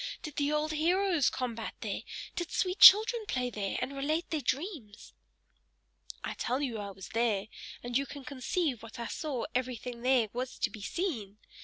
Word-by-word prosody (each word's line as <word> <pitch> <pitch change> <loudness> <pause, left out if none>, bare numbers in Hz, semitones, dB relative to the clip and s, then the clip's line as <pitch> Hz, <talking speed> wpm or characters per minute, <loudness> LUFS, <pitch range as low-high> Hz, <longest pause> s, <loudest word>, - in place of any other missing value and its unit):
Did 305 -3 -7
the 290 0 +1
old 300 +1 0
heroes 340 -1 +2
combat 235 -3 -4
there? - - -3 0.3
Did 345 -2 -3
sweet 365 0 0
children 440 +3 +9
play 250 -1 -1
there, 200 -3 -2
and 275 - -4
relate 310 +5 -1
their 310 -2 0
dreams?" 275 - -4 1.1
"I - - -3
tell 255 +2 -1
you 250 -6 -2
I 200 -1 -5
was 190 -1 -10
there, 220 -4 +1 0.4
and 245 0 -5
you 275 +2 +2
can 280 -2 -9
conceive 270 +1 -1
that 225 +1 -11
I 235 - -3
saw 275 -4 -3
everything 250 -1 -3
there 250 -3 +3
was 255 +1 -4
to 225 - 0
be 215 - -9
seen. 220 - -3
260 Hz, 175 wpm, -31 LUFS, 230-310 Hz, 1.1 s, children